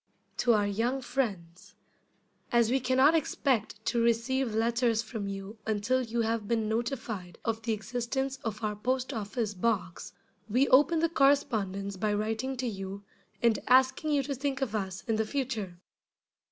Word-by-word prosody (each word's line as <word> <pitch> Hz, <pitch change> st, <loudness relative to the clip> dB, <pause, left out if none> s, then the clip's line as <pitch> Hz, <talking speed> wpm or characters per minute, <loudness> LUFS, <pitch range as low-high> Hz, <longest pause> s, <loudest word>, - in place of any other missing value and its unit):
] -, -, -41 dB
To 240 Hz, -, +4 dB
our 210 Hz, -2 st, +3 dB
Young 230 Hz, +6 st, 0 dB
Friends: 195 Hz, -11 st, -4 dB, 0.8 s
As 235 Hz, -2 st, +3 dB
we 265 Hz, -, +3 dB
can 255 Hz, 0 st, 0 dB
not 280 Hz, +4 st, +6 dB
expect 255 Hz, -8 st, 0 dB
to 235 Hz, -1 st, +1 dB
receive 235 Hz, +1 st, +1 dB
letters 230 Hz, 0 st, +2 dB
from 220 Hz, -2 st, -5 dB
you 195 Hz, +2 st, -6 dB
until 220 Hz, +4 st, +1 dB
you 235 Hz, -1 st, -1 dB
have 225 Hz, -2 st, -1 dB
been 225 Hz, -1 st, 0 dB
notified 220 Hz, -, -3 dB
of 225 Hz, -1 st, -1 dB
the 225 Hz, 0 st, -1 dB
existence 245 Hz, +5 st, -2 dB
of 220 Hz, -1 st, -4 dB
our 210 Hz, -1 st, -1 dB
Post 255 Hz, +5 st, -1 dB
office 215 Hz, 0 st, -2 dB
Box, 185 Hz, -3 st, -2 dB, 0.4 s
we 255 Hz, +6 st, +3 dB
open 295 Hz, +5 st, +5 dB
the 335 Hz, -, +4 dB
correspondence 215 Hz, -, +1 dB
by 210 Hz, +2 st, 0 dB
writing 225 Hz, +5 st, -2 dB
to 250 Hz, 0 st, -2 dB
you, 195 Hz, -2 st, -5 dB, 0.4 s
and 230 Hz, -2 st, +4 dB
asking 260 Hz, +4 st, +4 dB
you 290 Hz, -2 st, +2 dB
to 280 Hz, -, -3 dB
think 270 Hz, 0 st, -2 dB
of 230 Hz, -5 st, -3 dB
us 190 Hz, -3 st, -3 dB
in 225 Hz, -3 st, 0 dB
the 220 Hz, -, +2 dB
future. 225 Hz, -9 st, -3 dB
230 Hz, 165 wpm, -29 LUFS, 210-260 Hz, 0.8 s, not